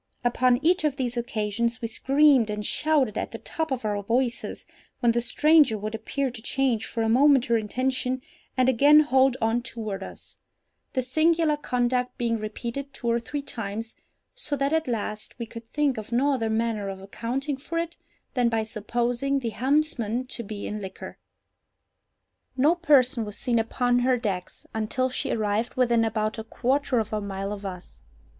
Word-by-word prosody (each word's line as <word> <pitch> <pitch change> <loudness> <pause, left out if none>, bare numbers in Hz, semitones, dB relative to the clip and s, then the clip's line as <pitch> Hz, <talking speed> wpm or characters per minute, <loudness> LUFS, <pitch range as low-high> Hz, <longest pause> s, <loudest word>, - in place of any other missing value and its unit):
Upon 245 +1 +3
each 355 0 +4
of 300 -3 +1
these 250 -3 -2
occasions 230 0 -1
we 230 - -3
screamed 270 0 +4
and 210 0 -3
shouted 295 -6 +1
at - - -3
the - - -5
top 320 -1 -3
of 255 -4 -3
our 205 -1 -1
voices, 240 +4 -1 0.3
when 235 - +4
the 235 +1 +1
stranger 300 -2 +4
would 215 +1 -5
appear 260 +4 -2
to 235 -2 -9
change 240 -2 0
for 230 - -2
a - - +1
moment 265 +2 +5
her 235 - +2
intention, 255 +3 -1 0.3
and 255 0 +4
again 285 +4 +6
hold 265 -3 +3
on 225 +2 +1
toward 220 -5 -5
us—this 255 +5 -9
singular 315 +2 +3
conduct 250 -3 -1
being 230 -1 0
repeated 235 +6 -5
two 235 -2 -1
or 235 - +2
three 280 +5 -5
times, 225 -2 -5 0.4
so - - -2
that 275 +2 0
at 320 -2 +1
last 215 -2 -4
we 235 - -4
could 230 0 -10
think 280 -1 0
of 215 +1 -9
no 275 +4 +3
other 225 -4 -1
manner 220 -2 -1
of 190 -1 -6
accounting 250 +8 -3
for 330 +5 -5
it 335 0 -2 0.4
than 245 -3 +2
by 225 -1 0
supposing 240 +5 -1
the 245 -4 -2
helmsman 255 -1 0
to 255 - -6
be 210 -2 -6
in 210 0 -4
liquor. 190 -1 -8 1.4
No 290 +6 +5
person 280 -8 +3
was 210 0 -7
seen 240 -3 +1
upon 245 +2 +1
her 250 0 +3
decks 195 -6 -4
until 250 +4 0
she - - -1
arrived 215 +1 -1
within 240 -2 +3
about 215 0 -1
a - - -4
quarter 255 +3 0
of 220 -1 -1
a 210 - 0
mile 195 0 -4
of 200 -1 -6
us. 180 -1 -9
240 Hz, 180 wpm, -26 LUFS, 220-270 Hz, 1.4 s, again